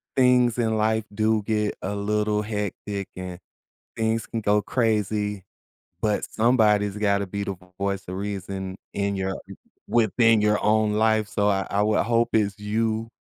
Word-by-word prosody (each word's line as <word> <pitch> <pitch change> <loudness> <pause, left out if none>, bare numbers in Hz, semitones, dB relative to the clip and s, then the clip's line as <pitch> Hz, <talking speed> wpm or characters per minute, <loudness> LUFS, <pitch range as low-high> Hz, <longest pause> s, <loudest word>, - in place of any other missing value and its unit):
things 125 -2 +4
in 110 -2 +1
life 110 0 +1
do 110 0 +2
get 105 -1 0
a 100 +2 -3
little 105 +1 0
hectic 105 -1 -4
and 90 -1 -7 0.6
things 110 0 0
can 115 -1 -3
go 105 0 +3
crazy, 105 -4 0 0.6
but 105 -1 +1
somebody's 105 -3 +3
gotta 100 -1 +1
be 100 +2 -4
the 100 - -3 0.2
voice 100 -1 -2
of 90 - -4
reason 95 -1 -4 0.2
in 100 0 -1
your 95 0 -2 0.5
within 115 -1 +4
your 105 0 +2
own 110 0 +3
life. 110 -1 +2
So 105 0 +1
I 95 -1 +1
I 100 +1 +1
would 105 0 +2
hope 115 0 +2
it's 100 -2 +1
you 110 +2 -1
105 Hz, 155 wpm, -24 LUFS, 100-110 Hz, 0.6 s, things